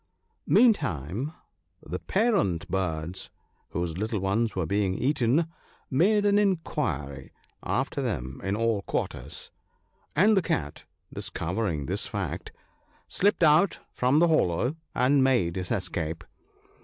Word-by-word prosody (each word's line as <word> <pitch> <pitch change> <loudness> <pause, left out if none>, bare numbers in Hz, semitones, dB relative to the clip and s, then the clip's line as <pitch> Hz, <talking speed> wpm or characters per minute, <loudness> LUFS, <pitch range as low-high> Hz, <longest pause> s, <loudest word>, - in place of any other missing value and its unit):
Mean 240 -2 +6
time 110 - -4 0.5
the 90 +4 -5
parent 195 - +1
birds, 90 -2 -2 0.4
whose 85 0 -3
little 110 0 -1
ones 105 +4 0
were 95 -3 0
being 100 +2 0
eaten, 135 - +2 0.5
made 205 +10 +3
an 205 0 +4
inquiry 75 - -1 0.3
after - - -1
them 65 +2 -3
in 95 +1 0
all 115 -2 +1
quarters; - - -4 0.6
and 210 +7 +5
the 190 - +4
Cat, 75 - -3 0.3
discovering 85 -4 -2
this - - -1
fact, - - -4 0.6
slipped 200 -2 +2
out 155 +5 +5
from 130 +3 +2
the 170 +2 +5
hollow, 125 - +2 0.2
and 135 +2 +4
made 120 -11 +2
his 90 -1 -3
escape. 80 +2 -2
110 Hz, 120 wpm, -27 LUFS, -, 0.6 s, Mean